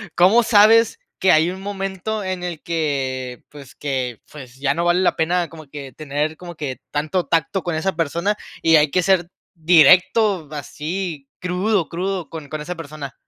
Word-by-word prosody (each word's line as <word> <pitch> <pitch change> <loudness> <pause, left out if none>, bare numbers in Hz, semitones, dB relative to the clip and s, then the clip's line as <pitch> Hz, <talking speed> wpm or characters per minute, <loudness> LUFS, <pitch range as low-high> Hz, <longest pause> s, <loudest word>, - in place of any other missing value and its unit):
cómo 190 +7 +5
sabes 225 - +5 0.2
que 190 - +4
hay 160 +3 +4
un 190 +1 -8
momento 195 +1 -4
en 185 -1 -3
el 170 -4 -5
que 135 -6 -2
pues, 145 -2 -13
que 130 -5 -3
pues, 130 -4 -11
ya 140 0 +1
no 170 +2 -1
vale 175 +1 +3
la - - +2
pena 170 +1 0
como 155 -3 -12
que 140 -2 -8
tener 150 +2 -3
como 175 0 -10
que 135 -5 -5
tanto 155 +5 -1
tacto 165 +3 0
con 175 0 -3
esa 160 +3 -1
persona 170 +6 0 0.3
y 165 0 +5
hay 150 -1 +3
que 180 +3 +1
ser 175 -2 +2 0.3
directo, 175 +2 +4
así, 150 +1 -5
crudo, 180 +1 0
crudo 185 0 -3
con 155 -3 -9
con 155 - -4
esa 175 +4 -4
persona? 150 -5 -8
165 Hz, 175 wpm, -21 LUFS, 150-185 Hz, 0.3 s, cómo